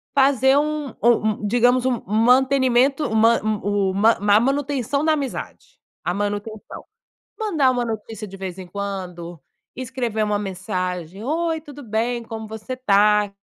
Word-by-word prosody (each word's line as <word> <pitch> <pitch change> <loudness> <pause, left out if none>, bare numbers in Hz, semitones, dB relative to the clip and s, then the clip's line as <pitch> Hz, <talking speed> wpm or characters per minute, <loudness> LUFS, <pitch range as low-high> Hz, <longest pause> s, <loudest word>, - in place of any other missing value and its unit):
fazer 270 0 +4
um 300 -3 -1
um 220 -3 +2
digamos, 245 +3 +3
um 255 - +2
um 205 - -5
mantenimento, 260 +3 +3
uma 225 +1 +3
uma 205 0 +1 0.2
a - - +7
manutenção 280 +1 -1
na 315 - +3
amizade, 305 - -6 0.3
a 175 - 0
manutenção. 205 +2 -5 0.5
Mandar 320 -12 +2
uma 245 -1 -1
notícia 220 -1 -6
de 195 0 -10
vez 185 -1 -6
em 185 - -7
quando, 180 -4 -6 0.4
escrever 245 -4 -2
uma 210 -1 0
mensagem: 185 -1 -4
"Oi, 320 +3 -1
tudo 290 -2 -11
bem, 235 +1 -2
como 220 -1 -7
você 220 +4 -6
tá? 210 -3 +3
225 Hz, 140 wpm, -22 LUFS, 205-265 Hz, 0.5 s, a